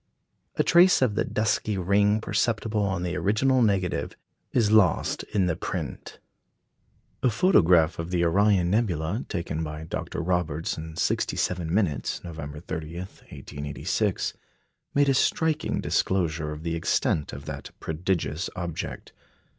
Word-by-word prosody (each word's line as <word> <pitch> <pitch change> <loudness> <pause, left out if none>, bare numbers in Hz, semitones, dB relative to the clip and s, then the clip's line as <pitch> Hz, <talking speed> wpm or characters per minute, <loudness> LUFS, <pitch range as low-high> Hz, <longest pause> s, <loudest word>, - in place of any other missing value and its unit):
A - - +2
trace 175 -4 +6
of 120 -5 +2
the 105 - +1
dusky 110 -1 0
ring 100 +3 +2
perceptible 110 -2 0
on 95 -3 -1
the 90 0 -2
original 125 +7 +2
negative 100 -5 +1 0.4
is 110 -4 +2
lost 110 -5 +3
in 95 -3 0
the 90 -2 0
print. - - -5 1.0
A 130 - +3
photograph 90 - +4
of 85 +1 -4
the 90 -1 +1
Orion 95 0 +3
nebula 100 - 0
taken 85 -4 -3
by 75 0 -5
Dr. 80 - -5
Roberts 85 -3 -1
in 80 0 -8
67 85 0 -1
minutes, 85 - 0
November 75 -3 -7
30, 80 -1 -6
1886, 75 -5 -3 0.6
made 145 0 +4
a 135 - +4
striking 155 +3 +1
disclosure 85 -5 0
of 75 +1 -7
the 85 0 -2
extent 80 -2 0
of 70 +2 -8
that - - -6
prodigious 80 0 -2
object. 85 -3 -5
90 Hz, 130 wpm, -26 LUFS, 80-105 Hz, 1.0 s, trace